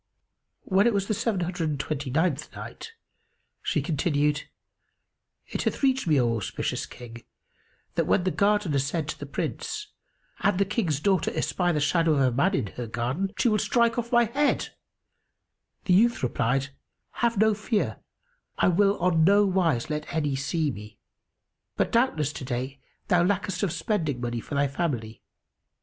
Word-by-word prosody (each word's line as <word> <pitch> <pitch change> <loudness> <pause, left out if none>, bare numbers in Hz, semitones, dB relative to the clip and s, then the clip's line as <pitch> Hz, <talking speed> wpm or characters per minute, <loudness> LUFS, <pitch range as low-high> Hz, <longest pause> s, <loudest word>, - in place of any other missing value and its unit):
When 195 +3 +3
it 235 - +2
was 195 -1 +1
the 215 - +1
Seven 205 -2 -1
Hundred 175 -2 -2
and 145 -2 -3
Twenty 140 -1 -3
ninth 155 +2 0
Night, 455 - -8 0.7
She - - 0
continued, 150 -2 0 1.0
It - - -4
hath - - -2
reached 265 -6 +2
me, 150 -4 +4
O 115 -2 +2
auspicious 105 - -3
King, 120 -1 -11 0.7
that - - 0
when 180 - +3
the 185 - +1
Gardener 200 -8 +2
said 150 +3 -2
to - - -5
the 145 - -6
Prince, 420 - -4 0.5
"An 200 -2 +2
the 200 - +3
King's 185 - -1
daughter 190 +2 +2
espy 175 -1 0
the 155 - 0
shadow 165 +2 +2
of 140 - +2
a 130 -1 +3
man 180 +11 +2
in 120 - -1
her 120 -1 -4
garden, 125 - -2
she - - +2
will 215 -2 +3
strike 230 +3 +2
off 235 0 -4
my 240 -1 +5
head;" 280 +6 0 1.2
the 180 - +3
youth 230 - +4
replied, 125 +3 0 0.5
"Have 235 -2 +2
no 220 +2 +4
fear, 210 +1 -1 0.6
I - - +4
will 200 +3 +3
on 170 -2 +2
no 200 +4 +5
wise 170 -9 +1
let 150 0 -3
any 150 -4 0
see 145 +2 -1
me. 105 -1 -10 0.8
But - - +1
doubtless 160 - +1
to - - -7
day 130 +2 -4 0.3
thou 175 -1 +4
lackest 195 0 0
of 200 -5 0
spending 160 - -1
money 120 -1 -2
for 140 - -6
thy 140 0 +3
family." 130 -7 -3
165 Hz, 170 wpm, -26 LUFS, 140-205 Hz, 1.2 s, my